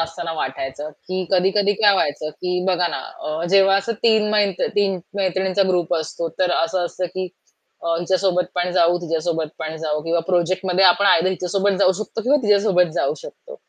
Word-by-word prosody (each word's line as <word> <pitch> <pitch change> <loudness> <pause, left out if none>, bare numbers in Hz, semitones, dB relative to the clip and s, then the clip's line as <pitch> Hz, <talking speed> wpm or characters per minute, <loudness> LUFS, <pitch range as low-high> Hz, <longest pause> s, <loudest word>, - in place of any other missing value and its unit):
असतांना 165 0 -4
वाटायचं, 135 0 -5
की 185 +4 -5
कधी-कधी 195 +2 +2
काय 205 -2 +6
व्हायचं, 155 -3 -1
की 180 +3 -3
बघा 180 -2 +2
ना - - -4
अ, 155 +2 -6
जेव्हा 195 0 +5
असं 200 +4 -1
3 220 -2 +3
मै 210 -1 +3 0.2
3 200 -2 0 0.2
मैत्रिणींचा 190 0 0
ग्रुप 175 -2 +1
असतो 165 +1 -4
तर 185 -1 +2
असं 175 +2 0
असतं, 180 +1 -3
की 185 0 -3 0.5
अ, 165 0 0
हिच्यासोबत 180 +1 +1
पण 180 0 -1
जाऊ, 175 -1 +3
तिच्यासोबत 165 -1 -2
पण 160 0 -5
जाऊ 155 -1 -2
किंवा 165 +1 0
प्रोजेक्टमध्ये 185 +1 +1
आपण 190 +2 +5
आयदर 180 -2 +4
हिच्यासोबत 190 +1 -1
जाऊ 190 -2 +4
शकतो 225 - -6
किंवा 270 +6 +3
तिच्यासोबत 200 -5 +3
जाऊ - - 0
शकतो. - - -12
180 Hz, 175 wpm, -21 LUFS, 165-195 Hz, 0.5 s, काय